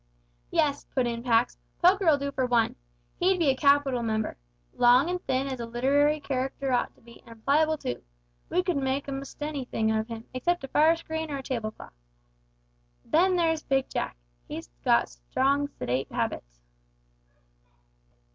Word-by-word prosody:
"Yes," 285 -1 +1
put 255 -2 +2
in 235 -1 -2
Pax, 235 -1 +2 0.2
"Poker'll 360 -4 +5
do 280 0 -3
for 260 -2 0
one. 235 -2 +2 0.4
He'd 370 +1 +3
be 320 -6 +3
a - - -1
capital 280 -2 +3
member. 220 -1 -1 0.4
Long 250 +7 +5
and 360 0 -3
thin 260 +1 +1
as 265 -2 -4
a 235 - -4
literary 285 +6 +2
c'racter 270 -1 -2
ought 245 - 0
to - - -25
be, 235 0 -16
and 230 -1 -14
pliable 310 +3 +3
too. 120 - -4 0.5
We 360 - +1
could 360 -5 0
make 270 +1 -1
a'most 275 +1 -6
anything 260 -7 -1
of 220 0 0
him, 230 -1 -7
except 345 +6 0
a 270 - -6
fire 315 +4 +5
screen 320 -1 -5
or 285 - -3
a 270 - -7
tablecloth. 230 - -5 1.1
Then 365 +4 +3
there's 325 -2 +1
Big 270 -2 0
Jack - - -3 0.3
he's - - -7
got - - +4
strong 270 - 0
sedate 125 - -3
habits." - - -4
270 Hz, 160 wpm, -27 LUFS, 235-305 Hz, 1.1 s, Poker'll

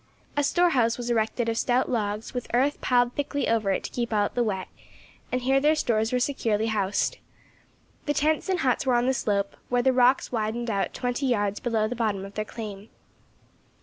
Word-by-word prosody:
A 290 - +2
storehouse 275 -8 +2
was 240 -1 -3
erected 225 +1 0
of 230 0 0
stout 250 +1 +2
logs, 210 -1 -2
with 245 -2 -4
earth 275 +4 +1
piled 245 -1 +2
thickly 285 0 -2
over 225 -3 +1
it 195 - 0
to - - -6
keep 235 -1 -3
out 205 -1 +1
the 245 - +1
wet, 190 -4 -2 0.6
and 255 - 0
here 265 +2 +3
their 300 +3 +3
stores 225 -6 0
were 250 - +1
securely 225 -5 0
housed. 200 -1 0 0.9
The 290 - +2
tents 310 +5 +1
and 365 -3 +1
huts 255 -4 +1
were 250 - +4
on 240 0 +2
the 265 - +2
slope, 200 -5 -1
where 245 0 +2
the 260 0 +4
rocks 255 +1 +3
widened 230 0 -2
out 200 -1 -1
twenty 245 +2 -1
yards 205 -4 0
below 225 -3 0
the 245 - -4
bottom 210 -4 -1
of 195 - -10
their 215 +1 -3
claim. 210 -2 -8
240 Hz, 200 wpm, -26 LUFS, 215-255 Hz, 0.9 s, were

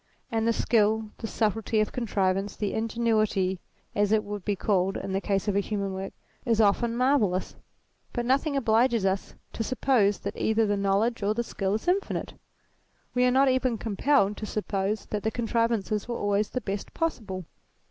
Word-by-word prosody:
And 225 0 0
the - - +4
skill, 220 -1 +2
the 225 - -4
subtlety 220 0 0
of 215 - +1
contrivance, 195 -4 0
the 210 -2 -2
ingenuity 215 -4 +1 0.3
as 205 0 +1
it 215 -1 +3
would 205 -1 -6
be 205 - 0
called 190 -1 +1
in 195 - -5
the 195 +1 0
case 195 0 -1
of 205 - +1
a - - +4
human 200 -1 -2
work, 190 +1 -5 0.3
is 230 -2 +1
often 230 +3 +3
marvellous. 240 -8 +1 0.6
But 240 -1 -2
nothing 275 +3 +1
obliges 230 -3 +3
us 190 0 -1 0.2
to 225 - -2
suppose 230 -4 +2
that 200 +2 -4
either 220 0 +2
the 205 -1 +1
knowledge 200 +4 +1
or 205 +1 +1
the 235 - 0
skill 195 -3 -2
is 220 - -5
infinite. 385 +3 0 0.8
We 250 0 +3
are - - +5
not 265 +2 +4
even 255 -2 +1
compelled 210 0 +1
to 215 - -5
suppose 205 0 -2
that 210 - -3
the 220 - 0
contrivances 230 -2 0
were 240 - -3
always 205 +1 0
the 255 - -3
best 200 -2 -5
possible. 210 - -2
215 Hz, 180 wpm, -27 LUFS, 200-235 Hz, 0.8 s, are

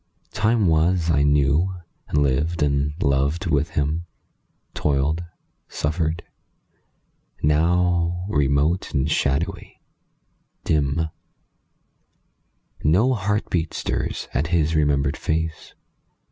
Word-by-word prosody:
Time 110 -1 +2
was 85 +1 +2
I 70 -2 +3
knew, 75 +5 +2 0.3
and 75 -1 +2
lived 75 +4 0
and 70 0 +1
loved 70 +6 +1
with 75 -1 +1
him; 75 +4 -1 0.7
Toiled, 75 +3 0 0.4
suffered. 80 +2 -2 1.2
Now, 85 +3 +2
remote 75 +2 +1
and 70 +1 +1
shadowy, 70 +4 -1 0.8
dim, 75 +1 0 1.7
No 100 - +3
heartbeat 100 -6 -1
stirs - - -3
at 75 +4 0
his 80 -2 +1
remembered 75 -1 +1
face. 80 0 -3
80 Hz, 90 wpm, -23 LUFS, 70-85 Hz, 1.7 s, I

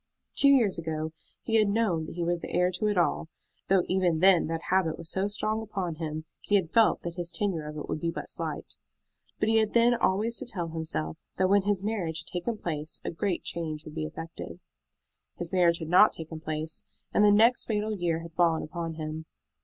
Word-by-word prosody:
Two 280 - +4
years 235 -10 +4
ago 160 -1 -3 0.3
he 225 -1 +2
had 215 -2 +4
known 200 -7 +1
that - - -8
he 175 - -2
was 175 0 0
the - - -6
heir 180 +1 +2
to 185 +4 -1
it 205 -2 0
all, 170 -1 +1 0.4
though 190 -2 +4
even 180 -3 +2
then 185 0 +5
that 165 0 -3
habit 185 -4 +2
was 165 -1 -4
so 190 +1 0
strong 215 +2 -1
upon 195 -5 -3
him 155 0 -5 0.2
he 205 - +1
had 185 -4 +1
felt 225 -1 +4
that 170 0 -5
his 175 -1 -2
tenure 190 -3 -1
of 150 - -8
it 150 - -5
would - - -3
be 170 - 0
but 165 - -5
slight. - - -5 0.6
But 215 - +1
he 225 - +4
had 220 -1 +2
then 235 +1 +5
always 225 0 +1
to 265 - -2
tell 175 -8 -3
himself 155 - -3 0.2
that 185 0 +2
when 200 +1 +5
his 200 -2 0
marriage 180 -7 -1
had 175 - -14
taken 185 +6 -2
place 155 -5 -4
a - - -1
great 180 +2 -2
change 155 -2 -4
would 155 - -9
be 155 -1 -3
effected. 165 +1 -8 0.8
His 175 +1 -4
marriage 175 -2 +4
had 160 - -6
not 185 +4 +6
taken 160 0 -7
place, 155 0 -4 0.3
and 210 - +4
the 205 - +7
next 225 +4 +4
fatal 215 -1 -1
year 170 -3 -1
had 165 0 -10
fallen 165 -1 +2
upon 165 0 -5
him. 155 0 -5
175 Hz, 220 wpm, -28 LUFS, 160-205 Hz, 0.8 s, the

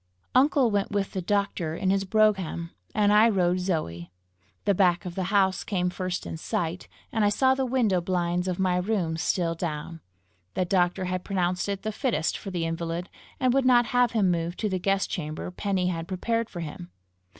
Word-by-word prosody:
Uncle 260 -2 +4
went 200 -1 0
with 200 -1 -1
the 190 - -3
doctor 185 -4 -1
in 190 +2 0
his 195 0 +1
brougham, 190 -5 +1 0.2
and 210 -1 +4
I 215 +2 +6
rode 180 -3 +2
Zoe. 90 - -3 0.5
The 200 - +4
back 180 -1 +2
of 180 - -5
the 185 0 -2
house 190 -1 +2
came 180 -3 -1
first 180 0 -3
in - - -5
sight, 170 +2 -3 0.2
and 220 -2 +1
I 205 - +5
saw 260 +6 +3
the 265 0 -1
window 225 -8 +2
blinds 180 0 -1
of 180 -1 -1
my 185 -1 +1
room 180 -4 0
still 165 +1 0
down. 165 -1 -5 0.5
The 185 - +1
doctor 180 0 +1
had 180 0 -2
pronounced 180 -1 -1
it 200 -1 -3
the 215 - -1
fittest 210 - -1
for 195 - -6
the 175 -3 -2
invalid, 165 +1 -3 0.3
and 255 -2 +3
would 270 0 +3
not 245 -1 +5
have 245 -1 +3
him 200 -5 +3
moved 170 +1 -2
to 215 - 0
the 185 -1 -1
guest 195 +1 +1
chamber 155 +1 -4
Penny 185 -1 -1
had 165 -2 -3
prepared 230 +5 -1
for 175 - -6
him. 150 - -7
185 Hz, 195 wpm, -26 LUFS, 175-205 Hz, 0.5 s, I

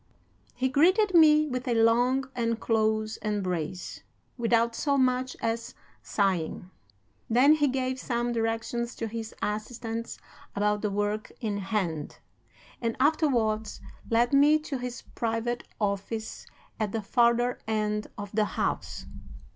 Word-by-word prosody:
"He 260 +1 +1
greeted 370 - +3
me 305 -2 +7
with 255 -3 -4
a 240 - +1
long 245 +4 +3
and 230 -1 0
close 220 -1 0
embrace, 185 -5 -3 0.3
without 235 -1 +2
so 280 +3 0
much 255 0 +1
as 230 +1 -2 0.3
sighing. 185 -2 -1 0.6
Then 255 +6 +6
he 295 -2 +3
gave 260 0 -1
some 240 -1 -1
directions 230 +1 -2
to 225 - -3
his 225 0 -6
assistants 225 +2 -4 0.4
about 210 0 +1
the 210 - 0
work 205 +1 -2
in 215 -5 -2
hand, 190 -7 -2 0.6
and 230 -1 -1
afterwards 240 -8 +1 0.3
led 235 +3 +2
me 290 +2 +6
to 285 -4 -4
his 245 -1 -6
private 230 +1 -2
office 210 +2 -3 0.3
at 215 -2 -1
the 225 -2 -2
farther 240 +2 +2
end 210 -1 -1
of 205 -1 -6
the 215 0 +2
house. - - -2
230 Hz, 130 wpm, -28 LUFS, 215-255 Hz, 0.6 s, me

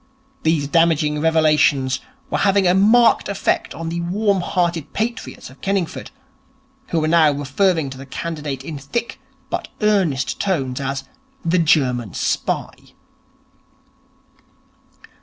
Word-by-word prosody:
These 160 -3 +1
damaging 155 -1 +2
revelations 150 -5 +3 0.3
were - - 0
having 195 -1 +3
a 180 - +4
marked 220 +5 +4
effect 200 - -1
on 165 0 -5
the 170 +1 -3
warm 195 +2 +1
hearted 170 -4 -1
patriots 225 - -4
of 135 - -19
Kenningford, 195 -4 -2 0.8
who 165 - 0
were 155 - 0
now 160 -2 +5
referring 145 +2 0
to 130 - -9
the 135 - -10
candidate 150 -3 -5
in 150 -1 -6
thick 230 - -4 0.3
but - - -3
earnest 190 -11 +1
tones 135 -10 -1
as 135 0 -3 0.4
'the 170 +2 +2
German 125 - +1
Spy'. - - -3
160 Hz, 120 wpm, -20 LUFS, 140-185 Hz, 0.8 s, now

